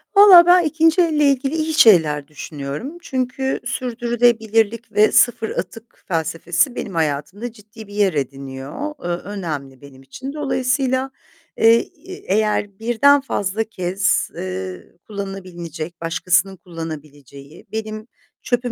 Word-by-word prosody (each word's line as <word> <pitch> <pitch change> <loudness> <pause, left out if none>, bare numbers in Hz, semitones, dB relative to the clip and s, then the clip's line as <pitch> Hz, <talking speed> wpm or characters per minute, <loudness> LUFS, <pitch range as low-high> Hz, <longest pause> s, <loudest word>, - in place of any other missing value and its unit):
Vallahi 380 -4 +9
ben 355 0 +6
ikinci 320 +3 +3
elle 310 -3 +2
ilgili 275 +3 -1
iyi 315 0 -1
şeyler 160 - +5
düşünüyorum. 150 - -7
Çünkü 265 -2 -2
sürdürülebilirlik 235 -2 0
ve 215 +1 +4
sıfır 230 -2 +3
atık 225 +5 -7
felsefesi 165 - 0
benim 190 - -5
hayatımda 165 +9 -2
ciddi 215 0 -14
bir 205 - -13
yer 205 -3 +2
ediniyor, 135 - -5
eee, - - -4
önemli 170 -8 -5
benim 140 -2 -14
için. 255 - -8
Dolayısıyla, 265 -2 -1 0.5
eee, 225 +1 +6 0.3
e 380 - -7 0.2
eğer 210 -2 -1
birden 240 +5 +4
fazla 215 -5 -2
kez, 190 -2 -1
eee, 95 -1 -5 0.2
kullanılabilecek, 180 -5 -7
başkasının 180 +3 +1
kullanabileceği, 150 - -10
benim 215 0 -5 0.4
çöpüm 245 0 -1
210 Hz, 120 wpm, -20 LUFS, 165-250 Hz, 0.5 s, Vallahi